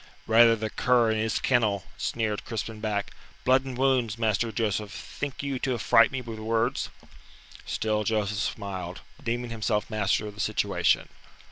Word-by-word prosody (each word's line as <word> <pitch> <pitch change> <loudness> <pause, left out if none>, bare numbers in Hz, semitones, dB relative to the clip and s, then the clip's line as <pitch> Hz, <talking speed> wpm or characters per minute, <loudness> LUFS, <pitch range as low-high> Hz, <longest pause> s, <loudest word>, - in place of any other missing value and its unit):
"Rather 115 +1 +6
the 110 -1 -4
cur 120 -3 +3
in 110 - 0
his 110 0 0
kennel," 110 -7 +2
sneered 110 -3 -2
Crispin 110 -1 -5
back. 105 -2 -2 0.3
"Blood 130 +1 +4
and 130 -2 -6
wounds, 125 -4 +2
Master 115 0 +1
Joseph, 105 -2 -1
think 140 +2 -6
you 140 -2 -2
to 130 -1 0
affright 115 0 +5
me 130 - -3
with 115 -2 -7
words?" 115 +3 0 0.8
Still 110 -1 0
Joseph 105 -1 0
smiled, 95 -4 -4 0.2
deeming 120 +1 -2
himself 110 -1 -1
master 105 0 +1
of 105 - -6
the 100 - -5
situation. - - +1
110 Hz, 155 wpm, -27 LUFS, 105-120 Hz, 0.8 s, Rather